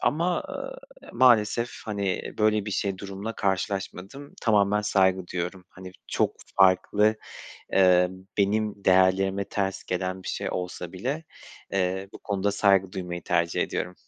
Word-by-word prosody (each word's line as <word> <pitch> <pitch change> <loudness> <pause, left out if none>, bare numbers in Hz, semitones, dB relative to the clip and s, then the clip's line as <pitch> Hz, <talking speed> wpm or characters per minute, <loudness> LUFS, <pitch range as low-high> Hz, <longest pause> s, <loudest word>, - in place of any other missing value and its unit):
ama, 170 +4 +1
eee, - - -9
maalesef 120 -1 +4
hani 100 -3 -3
böyle 105 -1 +2
bir - - -3
şey, 95 -1 -1
durumla 100 +3 -5
karşılaşmadım. 100 +6 -3
Tamamen 105 -2 +3
saygı 95 -3 +2
duyuyorum. 90 +1 -4
Hani 95 0 -11 0.2
çok - - 0 0.2
farklı, 100 +3 +4 0.6
eee, 90 -1 +5 0.3
benim 105 0 0
değerlerime 95 +1 +3
ters 95 -1 -3
gelen 95 +1 -3
bir - - -7
şey - - -3
olsa 90 -1 -5
bile, 135 - -3 0.5
eee, 95 0 -1
bu - - -10
konuda 100 0 -1
saygı 95 -2 +3
duymayı 90 -2 -5
tercih 85 0 +1
ediyorum. 90 - -3
95 Hz, 130 wpm, -26 LUFS, 95-105 Hz, 0.6 s, eee